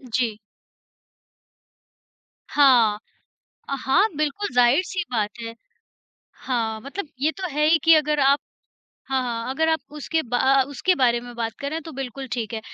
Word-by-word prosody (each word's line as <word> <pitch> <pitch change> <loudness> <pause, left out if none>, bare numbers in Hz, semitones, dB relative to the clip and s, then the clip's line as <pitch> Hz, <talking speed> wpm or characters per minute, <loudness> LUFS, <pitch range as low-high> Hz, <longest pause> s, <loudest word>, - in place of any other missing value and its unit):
जी। 230 -4 0 2.1
हाँ। 240 -7 +4 0.7
अ, 275 - -1
हाँ, 365 +11 +4
बिल्कुल 305 +7 -1
ज़ाहिर-सी 280 +10 +3
बात 210 -3 0
है। 230 0 -6 0.9
हाँ, 225 -4 -1
मतलब 310 - -6
ये 310 +2 +2
तो 380 - -3
है 300 +2 +1
ही 330 - +5
कि 330 0 +7
अगर 300 -1 +1
आप 280 +1 +4 0.7
हाँ, 265 -1 0
हाँ 235 -1 -3
अगर 320 +5 0
आप 320 - +2 0.2
उसके 320 +2 -1
बा 245 -1 -2
अ, 270 0 +4
उसके 285 +7 +1
बारे 240 -6 +2
में 245 0 -10
बात 225 -1 -3
करें 300 +3 -3
तो 320 - -9
बिल्कुल 265 0 -6
ठीक 230 -3 -3
है, 220 - -3
270 Hz, 155 wpm, -23 LUFS, 240-305 Hz, 2.1 s, कि